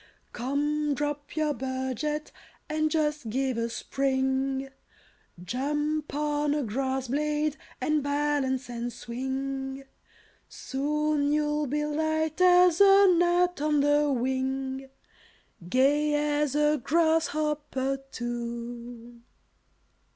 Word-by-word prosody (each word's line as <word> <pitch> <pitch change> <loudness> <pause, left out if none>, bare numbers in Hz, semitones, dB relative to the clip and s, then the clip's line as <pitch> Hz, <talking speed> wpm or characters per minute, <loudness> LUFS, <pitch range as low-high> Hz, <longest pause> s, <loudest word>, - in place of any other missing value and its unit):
Come! 290 +4 -1
drop 290 0 -4
your 310 -1 +1
budget, 265 +3 -3 0.4
and 310 0 0
just 300 -5 -1
give 260 +2 0
a 230 0 -1
spring; 265 +1 -1 0.7
Jump 295 +7 -2
on 295 0 0
a 295 - 0
grass 265 +3 -2
blade, 300 +2 0 0.2
and 305 -1 +1
balance 285 -2 0
and 240 0 -4
swing; 265 +3 -4 0.7
Soon 295 +1 -1
you'll 300 0 +1
be 295 +3 -1
light 315 +2 -1
as 360 -1 +6
a 395 0 +7
gnat 350 -1 +2
on 300 -1 +2
the 290 0 +3
wing, 265 +1 -2 0.8
Gay 290 +5 +3
as 295 -1 0
a 300 -1 +2
grasshopper, 300 -4 +1
too!" 235 0 -6
290 Hz, 100 wpm, -27 LUFS, 265-300 Hz, 0.8 s, a